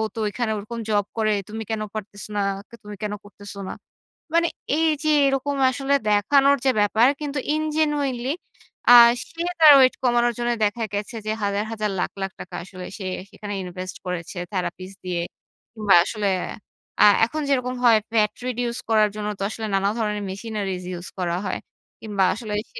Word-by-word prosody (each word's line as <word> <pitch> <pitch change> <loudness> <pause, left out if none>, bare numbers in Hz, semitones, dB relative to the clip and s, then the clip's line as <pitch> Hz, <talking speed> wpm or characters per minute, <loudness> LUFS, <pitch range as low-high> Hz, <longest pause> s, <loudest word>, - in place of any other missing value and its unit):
তো - - -4
ঐখানে 220 +2 -2
ওরকম 215 +3 -6
জব 205 -2 +2
করে। 215 -1 +2 0.2
তুমি 220 +1 -5
কেন 220 -1 -1
পারতেছ 210 -1 -7
না? 205 - +1 0.3
কে - - -12
তুমি 210 0 -8
কেন 210 -1 -2
করতেছ 205 0 -11
না?" - - -4 0.6
মানে 335 0 +4 0.3
এই 325 0 +3 0.2
যে, 310 - +2 0.2
এরকম 275 +1 0 0.2
আসলে 275 +2 -1 0.2
দেখানোর 275 +7 +4
যে, 265 - +5
ব্যাপার 220 +3 +4
কিন্তু 290 -1 -2
in 310 - 0
genuinely 285 -4 0 0.6
আ - - +11 0.4
সে 330 0 -7 0.2
তার 305 -2 +10
ওয়েট 260 -1 +5
কমানোর 240 -1 +3
জন্য 240 0 0
দেখা 210 +3 -1
গেছে 205 +3 -3
যে, - - +1
হাজার, 200 0 0
হাজার 215 -2 -2
লাখ, - - -1
লাখ 195 0 -2
টাকা - - -9
আসলে 185 0 -9
সে 190 - -5 0.2
সেখানে 205 -1 -7
ইনভেস্ট 185 +1 -7
করেছে, 180 0 -5 0.2
therapies 185 0 -4
দিয়ে। 175 -1 -1 0.5
কিংবা 215 -3 +4
আসলে 210 -1 -1 0.7
আ - - +9 0.2
এখন 310 +7 -4
যেরকম 255 -2 0
হয় 230 -3 +6
fat 215 -2 +3 0.2
reduction 245 -1 -2
করার 215 -1 +4
জন্য 210 -1 -4
তো - - -2
আসলে 220 0 -5
নানা 195 +1 +2
ধরনের 210 -2 -1
machineries 195 -2 -4
use 175 - -8
করা 175 -1 0
হয়। 190 - -2 0.4
কিংবা 205 -3 0
আসলে 215 -1 -6 0.2
সে - - -9
215 Hz, 175 wpm, -23 LUFS, 200-250 Hz, 0.7 s, আ